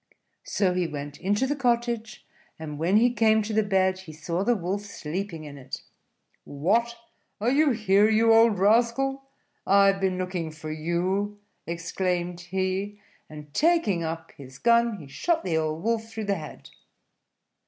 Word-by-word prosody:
So 190 -3 +1
he 180 -1 0
went 145 -2 -7
into 205 +7 +1
the 290 +2 -1
cottage; 235 -3 -1 0.3
and 150 -2 -7
when 180 +6 +3
he 240 +2 +4
came 220 -1 +3
to 215 +1 -4
the 220 - +3
bed, 190 -2 +1
he 175 -4 -11
saw 170 +4 -3
the 240 +3 +2
Wolf 195 +1 -2
sleeping 190 -4 -5
in 145 -2 -9
it. 130 - -8 0.6
"What! 220 +11 0 0.4
are 230 +4 +1
you 300 +2 +4
here, 215 -3 +3
you 225 +1 +4
old 225 -2 +5
rascal? 240 +7 +2 0.4
I 200 +1 +6
have 195 0 -6
been 190 -1 +1
looking 180 -3 -3
for 155 0 -8
you," 180 +6 -1 0.3
exclaimed 175 +1 -2
he; 190 +3 -3 0.3
and 150 -1 -11
taking 320 - +2
up 165 0 -5
his 130 -1 -13
gun, 235 +2 +3
he 150 -6 -11
shot 325 - -1
the 170 -3 -1
old 155 +1 -2
Wolf 225 0 -1
through 220 -1 -5
the 200 - +1
head. 155 -4 -10
195 Hz, 165 wpm, -26 LUFS, 170-225 Hz, 0.6 s, I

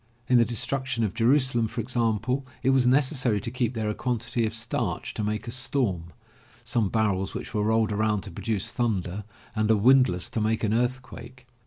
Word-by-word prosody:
In 125 -1 +5
the 115 - +4
Destruction 125 +1 -1
of 105 - -1
Jeru 120 +5 +4
salem, 125 -5 +2
for 115 +3 -6
example, 120 +2 0 0.2
it 130 - +3
was 130 -2 +3
necessary 130 -4 +3
to 115 - -5
keep 125 -1 -1
there 110 -1 -2
a 105 - 0
quantity 115 -1 -1
of 110 - -5
starch 115 0 -2
to 110 - -3
make 105 +2 -3
a - - -4
storm, 120 -8 -1 0.6
some 115 -3 0
barrels 100 -3 0
which - - -6
were 105 - 0
rolled 110 0 +2
around 105 -1 0
to 100 0 -7
produce 105 +3 -2
thunder, 105 -5 -2 0.3
and 110 0 0
a 110 - +5
windlass 115 -6 +4
to 115 - -2
make 110 +1 0
an 110 0 +1
earthquake. 125 +1 -3
115 Hz, 195 wpm, -26 LUFS, 105-125 Hz, 0.6 s, In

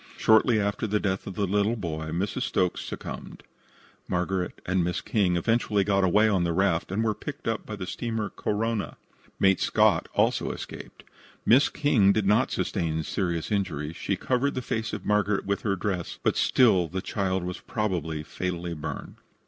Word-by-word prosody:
Shortly 110 +1 +4
after 100 +2 -1
the 105 +1 +1
death 95 -2 -2
of 95 - -6
the 100 - 0
little 105 +4 +1
boy 80 -7 -4
Mrs. 90 +5 -2
Stokes 90 -1 0
succumbed. - - -7 0.6
Margaret 90 0 -1
and 95 -1 +1
Miss 90 0 -1
King 95 -7 +1
eventually 105 +1 +1
got 100 -1 +2
away 105 +4 +4
on 95 -5 +2
the 85 -1 0
raft, 85 -2 +1
and 105 +4 0
were 110 -1 +1
picked 140 +4 -7
up 115 -1 -2
by 105 - -4
the 95 -3 -5
steamer 110 +2 -3
Korona. 110 0 -2 0.4
Mate 95 -1 +4
Scott - - +3
also - - +2
escaped. - - -8 0.4
Miss 130 +5 +5
King 125 -10 +3
did 110 -1 0
not 105 +6 +3
sustain 80 -4 -1
serious 85 -1 -2
injuries. 85 -6 -2
She 100 - -1
covered 130 +8 0
the 130 - -3
face 110 -1 -2
of 105 - -6
Margaret 105 -1 +1
with 100 0 -1
her 100 -3 0
dress, 90 -3 -3
but - - +2
still 100 -9 +4
the 95 +4 -4
child 95 -3 -1
was 90 0 -4
probably 85 - -2
fatally 90 +1 -4
burned. 75 -2 -6
100 Hz, 175 wpm, -27 LUFS, 90-110 Hz, 0.6 s, Miss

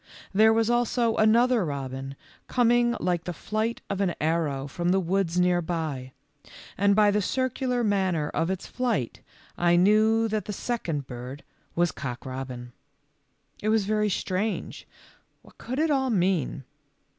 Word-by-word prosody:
There 220 +3 +6
was 225 0 +2
also 240 -1 +1
another 230 +1 +4
robin 135 -2 -5 0.3
coming 240 -1 +3
like 175 -2 -1
the 175 - -3
flight 220 +2 -2
of 195 0 -2
an 185 -3 0
arrow 155 -4 0
from 175 +5 -2
the 190 +2 +3
woods 180 -1 0
nearby, 165 -7 0 0.6
and 200 +1 +3
by 210 -1 +5
the 210 +1 +1
cir 260 +6 0
cular 250 -2 -1
manner 185 -7 +1
of 165 - -1
its 190 -1 -3
flight 235 - -2 0.4
I 175 0 +4
knew 215 +5 +4
that 215 -1 -2
the 210 - -4
second 175 - -3
bird 125 +2 -8 0.3
was 175 -1 +2
Cock 125 -3 -6
robin. 130 -2 -6 0.9
It 215 - 0
was 215 -2 +2
very 210 0 +1
strange. 195 +2 -3 0.6
What - - -20
could 255 +2 -5
it 315 +1 +2
all 265 -2 +1
mean? 180 - 0
190 Hz, 150 wpm, -26 LUFS, 160-225 Hz, 0.9 s, There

